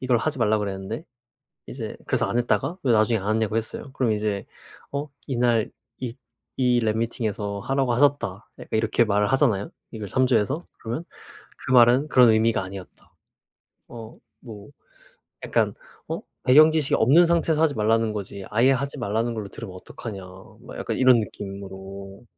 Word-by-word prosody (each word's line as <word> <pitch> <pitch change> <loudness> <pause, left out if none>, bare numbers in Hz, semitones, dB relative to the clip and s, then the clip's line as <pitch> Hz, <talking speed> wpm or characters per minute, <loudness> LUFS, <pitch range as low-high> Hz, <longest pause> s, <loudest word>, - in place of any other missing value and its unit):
이걸 125 -2 +2
하지 145 +3 -2
말라 110 -2 +2
그랬는데 100 +6 -4 0.6
이제 - - -6
그래서 - - +1
안 120 - -1
했다가 165 +8 0
왜 125 - +2
나중에 110 0 +3
안 105 +3 -1
했냐고 110 -1 -1
했어요. 115 +4 -4
그럼 125 -5 +1
이제 105 -2 -2 0.5
어 145 +1 -3 0.2
"이날 120 -4 +1 0.3
이 120 -3 -4 0.4
이 125 -2 +3
랩 110 -1 0
미팅에서 105 -3 -2
하라고 135 +2 0
하셨다." 125 -7 +1
약간 - - -11
이렇게 115 +2 +2
말을 105 -1 +1
하잖아요 120 -8 +1 0.2
이걸 110 -2 -6
참조해서? 130 - +1
그러면 120 +9 -5 0.5
"그 - - -6
말은 125 +4 +6
그런 125 -4 +6
의미가 110 -1 +3
아니었다." 95 0 -11 0.8
어 115 -2 -10 0.3
뭐 105 -3 -10 0.8
약간 - - +1 0.3
"어 - - -4 0.2
배경 155 +5 +7
지식이 155 -3 +2
없는 160 +9 +5
상태에서 165 -2 +1
하지 155 -3 +2
말라는 110 +1 +2
거지 100 -1 -6
아예 120 +5 +4
하지 140 +2 -1
말라는 115 0 -1
걸로 105 -3 -5
들으면 95 -4 -9
어떡하냐?" 95 +1 -8 0.4
막 - - -10
약간 - - -3
이런 130 -2 +6
느낌으로 100 -1 -8
115 Hz, 350 characters per minute, -24 LUFS, 105-130 Hz, 0.8 s, 배경